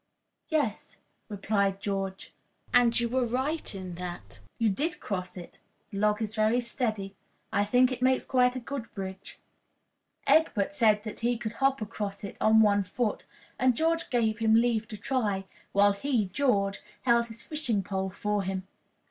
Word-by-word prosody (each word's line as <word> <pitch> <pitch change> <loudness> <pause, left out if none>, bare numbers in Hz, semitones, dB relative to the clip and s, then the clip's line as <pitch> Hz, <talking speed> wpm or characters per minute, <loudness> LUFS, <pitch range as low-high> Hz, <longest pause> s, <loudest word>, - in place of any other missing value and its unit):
"Yes," 290 - -1 0.3
replied 200 -1 0
George, 195 -1 -4 0.4
"and 240 -1 +5
you 235 - +1
were 255 +2 +1
right 260 +3 -1
in 185 -2 -6
that. 175 -1 -6 0.2
You 230 - +2
did 295 - -1
cross 185 -2 -4
it. 175 - -10 0.3
The 195 - -4
log 210 +1 +2
is 215 0 -4
very 220 +2 +2
steady. 215 -5 -3 0.4
I 205 -1 +2
think 250 +4 +4
it 250 -1 -4
makes 260 0 +2
quite 250 -1 +3
a - - -2
good 250 -1 -6
bridge." 190 -1 -7 0.9
Egbert 295 -7 +3
said 220 -5 +3
he 240 +1 +1
could 220 -2 -4
hop 270 -1 +1
across 205 -2 -5
it 200 - -6
on 220 0 +6
one 205 -1 +4
foot, 210 +3 -2 0.3
and 255 -2 +3
George 330 +1 +1
gave 230 -3 +1
him 220 -1 +4
leave 230 -1 +2
to 215 - -7
try, 205 -4 -1 0.3
while 205 +1 +5
he, 215 -1 0
George, 200 -3 +1 0.2
held 235 -2 +3
his 230 0 -11
fishing 250 -10 -1
pole 190 0 -2
for 205 +2 -1
him. 190 0 -4
220 Hz, 165 wpm, -28 LUFS, 200-250 Hz, 0.9 s, on